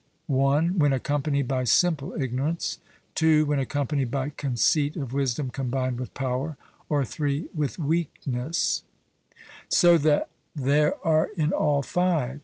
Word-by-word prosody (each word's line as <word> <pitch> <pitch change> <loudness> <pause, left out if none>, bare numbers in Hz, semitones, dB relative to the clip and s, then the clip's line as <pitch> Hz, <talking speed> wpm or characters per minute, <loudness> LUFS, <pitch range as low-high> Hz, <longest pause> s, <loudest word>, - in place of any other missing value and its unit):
(1) 145 +6 +2
when 145 -2 +4
accompanied 140 0 0
by 130 -1 0
simple 155 +2 +2
ignorance, 135 +5 -2 0.3
(2) 155 -1 +4
when 145 -1 0
accompanied 140 0 -1
by 135 +2 -2
conceit 145 +2 +1
of 135 -6 -5
wisdom 135 -1 -1
combined 130 -1 -2
with 125 - -5
power, 135 +3 -2 0.3
or 145 -3 +1
(3) 145 +4 -2
with 150 -3 -2
weakness), 155 -3 -1 0.9
so 175 -2 +5
that 150 0 +2 0.3
there 145 +2 +2
are 160 0 +3
in 155 0 +1
all 145 -5 +2
five. 155 -4 0
145 Hz, 130 wpm, -26 LUFS, 135-155 Hz, 0.9 s, so